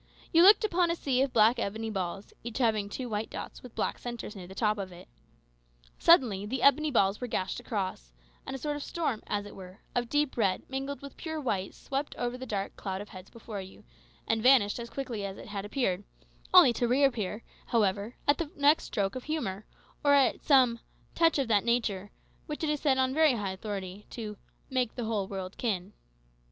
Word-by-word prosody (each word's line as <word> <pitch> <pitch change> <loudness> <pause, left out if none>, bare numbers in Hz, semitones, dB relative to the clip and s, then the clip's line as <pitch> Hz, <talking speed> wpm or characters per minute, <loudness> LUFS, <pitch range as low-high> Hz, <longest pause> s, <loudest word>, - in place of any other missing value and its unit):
You 330 - +7
looked 405 +5 +8
upon 360 -4 +2
a 335 - +1
sea 265 -6 0
of 270 -1 +1
black 225 +2 +5
ebony 220 +2 -3
balls, 190 0 -4
each 235 -1 -5
having 220 -5 +1
two 250 +4 -5
white 215 -1 -3
dots - - -7
with 250 - -12
black - - -1
centres 240 -3 -6
near 185 -3 -8
the 190 - -11
top 215 -1 +1
of 190 -2 -5
it. 180 +1 -13 0.9
Suddenly 225 - +5
the 255 +2 -2
ebony 300 +3 +5
balls 200 -5 +2
were 250 - -2
gashed 190 0 -2
across, 190 - -4 0.3
and - - -5
a - - -3
sort 295 +2 -2
of - - -6
storm, 280 -8 -2
as 205 -1 -2
it 205 - -10
were, 185 +1 -11
of 240 -1 -1
deep 295 -3 +1
red 195 -5 +1
mingled 275 +1 -4
with 280 - -10
pure 320 -2 -4
white 200 -9 -2
swept 275 +2 -4
over 245 0 -2
the 260 +1 -7
dark 200 -3 -3
cloud 190 -2 -4
of 205 - -8
heads 185 0 -11
before 225 -3 -7
you, 190 0 -12 0.4
and 225 0 +1
vanished 245 -4 +5
as 235 0 -6
quickly 245 -6 -4
as 195 -1 -5
it - - -10
had 200 -1 -4
appeared, 205 -5 -1 0.5
only 240 - +8
to 240 +1 0
reappear, 240 -5 +1 0.2
however, 210 0 +1
at 285 - +4
the 330 -3 -2
next 290 +2 +4
stroke 200 0 -1
of 255 - -6
humour, 215 -11 -3 0.4
or 285 -1 +6
at 275 -2 +3
some 255 -5 +4 0.3
"touch 330 -2 +3
of 275 -3 0
that 210 -3 +3
nature" 215 -5 0 0.4
which 300 +1 -5
is 300 -1 0
said 275 -3 +2
on 260 0 +2
very 310 -1 +5
high 205 -5 -2
authority, 195 0 -6
to 215 -3 -6 0.3
"make 255 -3 -1
the 240 - -3
whole 210 -3 -1
world 190 -2 -6
kin." 200 -4 -2
230 Hz, 205 wpm, -29 LUFS, 200-270 Hz, 0.9 s, looked